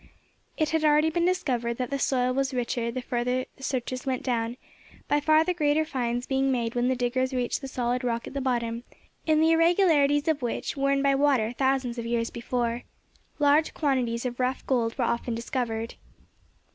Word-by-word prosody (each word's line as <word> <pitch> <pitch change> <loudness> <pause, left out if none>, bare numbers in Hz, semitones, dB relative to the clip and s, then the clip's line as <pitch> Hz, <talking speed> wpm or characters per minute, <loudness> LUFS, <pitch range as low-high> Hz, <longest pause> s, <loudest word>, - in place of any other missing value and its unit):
It 310 -2 0
had 320 -1 +1
already 305 +1 +4
been 345 +1 +1
discovered 255 -11 0
that 250 +1 -4
the 275 - -1
soil 255 -2 +1
was 270 0 -1
richer 240 -1 -1
the 250 +2 -4
further 250 +1 -1
the - - -19
searchers 255 -1 -3
went 260 -2 -2
down, 235 -1 -1 0.5
by 290 - +2
far 310 +2 +4
the 360 - 0
greater 310 -2 +1
finds 245 -4 -2
being 270 0 +1
made 235 -3 -1
when 245 0 +1
the 260 - +2
diggers 255 +1 -1
reached 250 +2 -1
the 270 - -5
solid 250 -1 -1
rock 235 -1 -1
at - - -8
the 280 - -2
bottom, 235 -2 -1 0.4
in 310 -1 +4
the 320 +1 +4
irregularities 325 -4 +3
of 310 -3 +1
which, 240 - -3
worn 275 0 +1
by 275 0 +4
water 270 -5 +2
thousands 260 -1 0
of 230 - -4
years 230 -1 -1
before, 235 0 -2 0.6
large 295 +2 +3
quantities 255 -5 0
of 245 0 -4
rough 255 +1 -1
gold 230 -3 0
were 250 - +1
often 235 0 -1
discovered. 230 -2 -3
255 Hz, 190 wpm, -27 LUFS, 240-285 Hz, 0.6 s, already